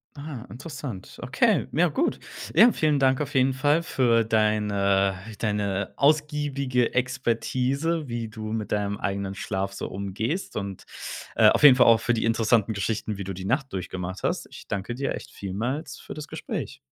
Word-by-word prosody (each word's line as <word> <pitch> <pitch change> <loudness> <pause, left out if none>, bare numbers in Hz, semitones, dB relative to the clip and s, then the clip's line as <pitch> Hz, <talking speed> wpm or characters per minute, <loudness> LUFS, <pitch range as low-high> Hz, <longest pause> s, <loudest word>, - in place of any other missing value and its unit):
Ah, 145 -5 -7
interessant. 125 - -8
Okay, - - +2
ja, - - +3
gut. - - 0 0.4
Ja, 230 +8 +8
vielen 155 -6 +2
Dank 135 +1 +3
auf 145 0 -4
jeden 130 0 +4
Fall 145 +5 +2
für 120 -7 +2
deine 105 -3 +2 0.2
deine 100 -3 -1
ausgiebige 140 -4 +1
Expertise, 130 +5 0
wie 120 -2 -3
du 110 0 -7
mit 110 -2 -3
deinem 100 -1 0
eigenen 100 -1 -3
Schlaf 95 0 -3
so - - -5
umgehst 100 - -3
und, 100 -2 -5 0.5
äh, - - +7
auf - - +2
jeden 140 -4 +10
Fall 125 - +5
auch 115 -1 +6
für 120 +2 +1
die 110 - 0
interessanten 115 -1 +2
Geschichten, 105 +1 -2
wie 100 - -4
du 95 +1 -5
die 95 +1 -7
Nacht 135 +6 0
durchgemacht 95 0 -5
hast. - - -1
Ich - - -12
danke 100 +4 -3
dir 135 +2 -2
echt - - -8
vielmals 130 - -4
für - - -9
das 150 0 -7
Gespräch. - - -5
115 Hz, 170 wpm, -26 LUFS, 100-135 Hz, 0.5 s, jeden